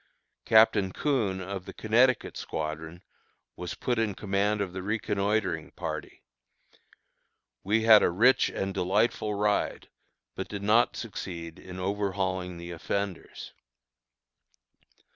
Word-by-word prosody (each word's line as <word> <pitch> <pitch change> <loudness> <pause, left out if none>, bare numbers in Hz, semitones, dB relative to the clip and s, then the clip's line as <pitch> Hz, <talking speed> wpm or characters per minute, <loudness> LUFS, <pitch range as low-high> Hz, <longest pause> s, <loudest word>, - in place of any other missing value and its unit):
Captain 110 -3 +5
Coon, 110 -8 0
of 95 0 -6
the - - -8
Connecticut 120 +3 +2
squadron, 80 +2 -5 0.5
was 90 - -6
put 120 -2 -1
in 105 -3 0
command 100 +1 0
of 95 -3 -3
the 95 - -4
reconnoitring 100 -4 -1
party. - - -6 1.4
We 110 +3 +1
had 110 -2 +8
a - - +3
rich 125 +9 +4
and 95 0 -3
delightful 105 +3 +1
ride, 105 0 0 0.4
but - - -5
did 100 -1 -6
not 110 +4 +3
succeed 85 -7 -6
in 90 0 -10
overhauling 95 -2 -2
the 85 +1 -8
offenders. 95 +3 -4
100 Hz, 115 wpm, -28 LUFS, 90-110 Hz, 1.4 s, had